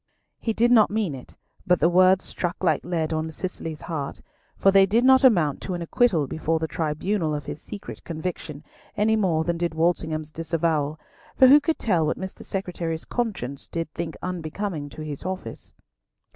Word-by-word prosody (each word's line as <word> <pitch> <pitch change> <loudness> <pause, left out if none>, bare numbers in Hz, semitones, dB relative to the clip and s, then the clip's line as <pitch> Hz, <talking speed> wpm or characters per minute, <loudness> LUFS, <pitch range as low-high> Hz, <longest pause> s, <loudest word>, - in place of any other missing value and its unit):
He 225 - -1
did 235 +2 +2
not 220 -4 +6
mean 210 -7 -1
it, 130 -2 -11 0.3
but 180 -1 +4
the 160 - +4
words 185 +2 +4
struck 175 +1 -4
like 160 -5 +2
lead 165 -2 -1
on 160 0 -2
Cicely's 160 -2 -6
heart, 145 -5 -4 0.4
for 195 - +4
they 195 0 +6
did 230 +5 +2
not 265 +1 +6
amount 170 - +4
to 185 - -3
an 175 - -4
acquittal 170 -4 +2
before 160 +3 -1
the 160 0 -2
tribunal 160 +2 -1
of 145 -2 -5
his 150 - -6
secret 200 - -9
conviction, 160 -3 -5 0.3
any 215 +2 +3
more 175 -7 +1
than 170 0 -2
did 170 -2 -1
Walsingham's 160 -2 0
disavowal, 160 -2 -1 0.4
for 260 - +8
who 275 +3 +9
could 315 +2 -1
tell 170 -8 +1
what - - -1
Mr. 190 0 -7
Secretary's 170 -4 -4
conscience 180 - -3
did 165 -3 -4
think 165 -2 -5
unbecoming 170 -2 -4
to 155 - -8
his 150 -2 -6
office? 185 0 -6
170 Hz, 180 wpm, -24 LUFS, 155-195 Hz, 0.4 s, who